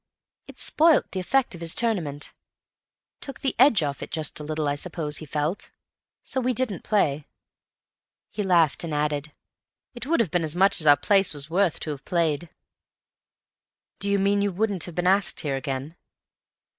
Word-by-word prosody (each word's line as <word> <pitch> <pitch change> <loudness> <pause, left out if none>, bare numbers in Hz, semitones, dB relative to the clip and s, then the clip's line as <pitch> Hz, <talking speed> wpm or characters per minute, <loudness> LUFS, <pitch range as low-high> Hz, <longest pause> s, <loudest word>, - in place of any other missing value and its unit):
It - - -13
spoilt 320 -2 +3
the 190 - -3
effect 265 +7 +1
of 170 - -10
his 165 -1 -1
tournament. 170 -11 -1 0.9
Took 275 -2 -6
the 270 - -1
edge 240 - +6
off 140 -1 -3
it - - -6
just 155 +1 -2
a - - -6
little, 155 0 -2
I 145 - +1
suppose 150 -1 -2
he 155 - -8
felt. 150 +6 -2 0.5
So 260 - -1
we 255 +1 0
didn't 220 -7 -2
play." 150 -9 0 1.0
He 210 - -3
laughed, 175 -7 +2
and 160 -3 -3
added, 150 0 -1 0.6
"It 240 0 -7
would 335 - +2
have 210 -9 +1
been 175 -2 +1
as 155 0 -3
much 190 -1 +4
as 155 - 0
our 145 0 +8
place 195 +3 +2
was 145 +2 -7
worth 185 -2 +1
to 155 - -3
have 140 -2 -7
played." 170 -2 0 1.5
"Do 200 - -1
you 200 - +3
mean 200 +1 +2
you 200 0 0
wouldn't 200 -1 -1
have 175 - -9
been 175 - -1
asked 195 +1 +2
here 140 -3 -2
again?" 135 +3 -4
170 Hz, 180 wpm, -25 LUFS, 150-200 Hz, 1.5 s, our